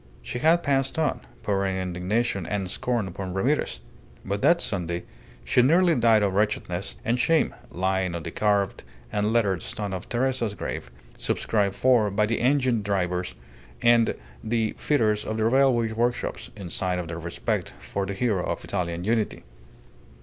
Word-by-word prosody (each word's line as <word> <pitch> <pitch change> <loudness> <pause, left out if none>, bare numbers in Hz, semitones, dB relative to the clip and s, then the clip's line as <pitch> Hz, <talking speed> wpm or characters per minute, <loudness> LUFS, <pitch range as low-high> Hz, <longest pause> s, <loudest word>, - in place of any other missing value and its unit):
She 125 - -4
had 165 +5 +4
passed 135 -1 +1
on, 160 -2 +1 0.2
pouring 95 -2 0
indignation 95 +2 -1
and 95 -3 -2
scorn 120 -3 -1
upon 95 0 -5
Ramirez; 120 - 0 0.4
but, 100 +1 -2
that 170 0 +5
Sunday, 85 - -2 0.4
she - - +3
nearly 170 +7 +5
died 115 -5 +4
of 100 -2 +1
wretchedness 100 -2 -1
and 120 +1 +1
shame, 165 +5 +3 0.2
lying 95 -1 0
on 85 - -4
the 85 - -5
carved 100 -1 +1 0.3
and 105 0 +1
lettered 100 -7 +2
stone 105 -2 -4
of 95 - -6
Teresa's 120 -3 0
grave, 75 - -5 0.3
subscribed 100 -3 0
for 120 -5 +4
by 100 +2 +2
the 115 +2 -1
engine 130 -3 +2
drivers 90 -6 -1 0.5
and 120 -1 +5 0.3
the 110 -1 0
fitters 110 -8 +1
of 110 - -3
the 110 - +1
railway 120 -2 +3
workshops, 120 +2 -1
in 90 -4 -7
sign 90 -1 0
of 90 -2 -4
their 85 0 -5
respect 85 0 -3
for 100 -1 -3
the 100 - -3
hero 105 -5 +1
of - - -3
Italian 85 -1 -2
Unity. 110 +1 0
105 Hz, 160 wpm, -26 LUFS, 95-120 Hz, 0.5 s, that